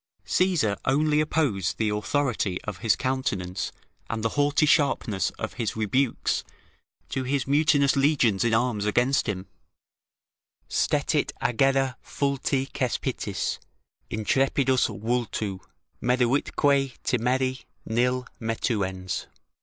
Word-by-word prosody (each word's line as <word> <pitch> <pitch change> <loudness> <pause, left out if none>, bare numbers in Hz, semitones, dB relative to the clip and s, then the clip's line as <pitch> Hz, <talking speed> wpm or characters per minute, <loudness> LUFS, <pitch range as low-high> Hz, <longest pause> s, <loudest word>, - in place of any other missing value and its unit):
Caesar 165 - +2
only 150 +3 +2
opposed 145 - 0
the 110 -1 +1
authority 105 -3 0
of 105 -3 -6
his 115 -3 +3
countenance 100 -9 -2 0.4
and 115 -1 -3
the 115 - +2
haughty 145 +3 +2
sharpness 135 - +2
of - - -4
his 110 - -2
rebukes 115 +4 0 0.6
to 135 - -2
his 135 +1 0
mutinous 145 -1 +3
legions 135 -8 +3
in 120 - +2
arms 110 -2 +1
against 125 +6 +2
him: 95 -2 -3 1.2
"Stetit - - +1
aggere 135 +1 +2
fulti 140 -1 -1
Cespitis, 130 -4 -2 0.5
intrepidus 130 +4 +2
vultu: 110 -2 -2 0.4
meruitque 125 +2 +1 0.5
timeri, 130 +1 0 0.2
Nil 125 +2 +1 0.2
metuens." 100 -5 -2
125 Hz, 100 wpm, -26 LUFS, 110-135 Hz, 1.2 s, his